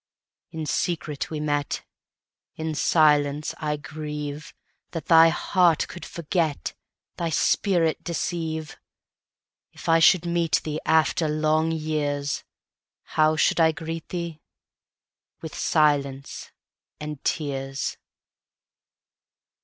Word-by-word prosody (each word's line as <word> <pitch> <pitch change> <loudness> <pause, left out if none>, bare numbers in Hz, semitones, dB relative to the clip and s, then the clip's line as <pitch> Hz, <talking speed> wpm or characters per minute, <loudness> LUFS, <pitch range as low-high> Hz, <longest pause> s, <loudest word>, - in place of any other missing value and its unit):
In 160 -1 -5
secret 155 -3 -2
we 155 - -4
met:In 150 +1 -5
silence 150 -1 +3
I 150 -1 -1
grieveThat 150 +2 -7
thy 165 -1 +7
heart 175 0 +2
could 175 - -9
forget, 160 - -2 0.4
Thy 170 -1 -1
spirit 165 +1 +1
deceive. 160 -2 -3 0.9
If - - -11
I 165 0 +5
should 175 +1 +5
meet 170 -1 0
theeAfter 155 +1 +1
long 155 +1 +2
years, 150 -3 -2 0.7
How 155 0 +4
should 160 - +2
I 160 -1 +5
greet 165 0 -6
thee?—With 165 -1 -10
silence 140 -3 0 0.5
and 150 -2 -6
tears. 135 -2 -2
155 Hz, 90 wpm, -25 LUFS, 150-165 Hz, 0.9 s, thy